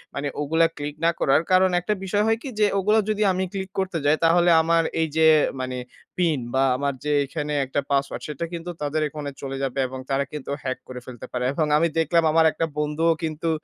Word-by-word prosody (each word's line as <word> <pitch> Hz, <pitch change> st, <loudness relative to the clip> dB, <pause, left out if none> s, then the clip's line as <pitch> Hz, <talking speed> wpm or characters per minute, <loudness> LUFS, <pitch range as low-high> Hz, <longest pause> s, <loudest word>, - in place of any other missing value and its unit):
মানে 140 Hz, +1 st, -2 dB
ওগুলা 160 Hz, +3 st, +3 dB
ক্লিক 145 Hz, 0 st, -5 dB
না 170 Hz, -, +5 dB
করার। 135 Hz, +3 st, +3 dB
কারণ 185 Hz, 0 st, +5 dB
একটা 195 Hz, +4 st, -1 dB
বিষয় 205 Hz, +2 st, +1 dB
হয় 225 Hz, 0 st, +2 dB
কি 275 Hz, -, -5 dB
যে 210 Hz, -, +5 dB
ওগুলো 210 Hz, +3 st, +3 dB
যদি 215 Hz, 0 st, +1 dB
আমি 185 Hz, +1 st, -1 dB
ক্লিক 190 Hz, -1 st, -4 dB
করতে 190 Hz, -3 st, -1 dB
যাই 150 Hz, +2 st, +4 dB
তাহলে 175 Hz, +1 st, +4 dB
আমার 165 Hz, 0 st, +2 dB, 0.2 s
এই 160 Hz, -, +1 dB
যে 160 Hz, 0 st, +5 dB, 0.3 s
মানে 130 Hz, 0 st, -4 dB, 0.4 s
পিন 165 Hz, -6 st, +1 dB
বা 135 Hz, 0 st, +3 dB
আমার 140 Hz, 0 st, -1 dB
যে 150 Hz, -, -1 dB
এখানে 150 Hz, +1 st, -4 dB
একটা 135 Hz, +2 st, -2 dB
পাসওয়ার্ড 140 Hz, 0 st, -1 dB
সেটা 150 Hz, +3 st, -4 dB
কিন্তু 170 Hz, +1 st, -5 dB
তাদের 150 Hz, +2 st, -1 dB
এখানে 145 Hz, -1 st, -6 dB
চলে 135 Hz, -1 st, -5 dB
যাবে 135 Hz, 0 st, -2 dB
এবং 130 Hz, +1 st, -7 dB
তারা 140 Hz, +1 st, +1 dB
কিন্তু 150 Hz, -3 st, -7 dB
হ্যাক 130 Hz, -1 st, -2 dB
করে 125 Hz, -1 st, -7 dB
ফেলতে 125 Hz, -3 st, -9 dB
পারে। 125 Hz, 0 st, -2 dB
এবং 155 Hz, 0 st, 0 dB
আমি 165 Hz, +2 st, +3 dB
দেখলাম 165 Hz, +1 st, +2 dB
আমার 160 Hz, 0 st, +4 dB
একটা 165 Hz, -, -1 dB
বন্ধুও 150 Hz, +2 st, +1 dB
কিন্তু 160 Hz, +1 st, -2 dB
155 Hz, 215 wpm, -24 LUFS, 140-170 Hz, 0.4 s, না